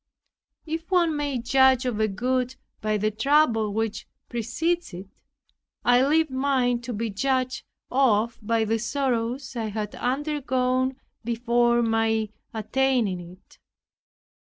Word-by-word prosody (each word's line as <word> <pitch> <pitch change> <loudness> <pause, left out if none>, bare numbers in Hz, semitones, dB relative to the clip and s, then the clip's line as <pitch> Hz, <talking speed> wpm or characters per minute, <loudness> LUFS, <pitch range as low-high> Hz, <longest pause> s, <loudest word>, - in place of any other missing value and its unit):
If 325 +2 -5
one 345 -4 +3
may 290 -3 -1
judge 260 +1 +4
of 240 -4 -1
a 220 - +3
good 250 +5 -1 0.3
by 215 0 0
the 215 +1 0
trouble 225 -2 +2
which 220 +1 -2 0.2
precedes 245 - -2
it, 190 +2 -12 0.6
I 245 +1 +5
leave 310 +1 +2
mine 260 -2 +1
to 245 +1 -6
be 225 0 -3
judged 255 +4 -1 0.3
of 235 -3 +2
by 225 +1 +1
the 225 +1 0
sorrows 255 +1 -2
I 230 -2 -2
had 210 0 -4
undergone 260 -1 0 0.3
before 235 +1 +2
my 225 -1 +1 0.2
attaining 230 -3 0
it. 175 +2 -14
245 Hz, 125 wpm, -25 LUFS, 220-265 Hz, 0.6 s, I